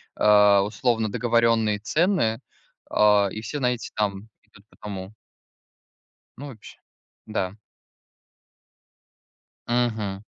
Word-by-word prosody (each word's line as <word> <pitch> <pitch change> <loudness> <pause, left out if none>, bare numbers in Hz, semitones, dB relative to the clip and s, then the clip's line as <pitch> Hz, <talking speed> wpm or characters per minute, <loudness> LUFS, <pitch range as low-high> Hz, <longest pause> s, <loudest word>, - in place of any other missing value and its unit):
а, 105 -1 +5
условно 110 +2 -1
договорённые 115 -3 +1
цены, 150 - +1 0.5
а, 105 -1 +4
и 110 - -6
все 145 +6 -5
на 125 -2 +1
эти 120 - -7
там 105 0 -2 0.2
идут 100 - -21
по - - -24
тому. 100 -2 -7 1.3
Ну, 145 +2 -8
вообще, 110 -6 -13 0.5
да. 100 -3 -3 2.1
Мгм. 110 -5 -1
110 Hz, 100 wpm, -24 LUFS, 100-120 Hz, 2.1 s, а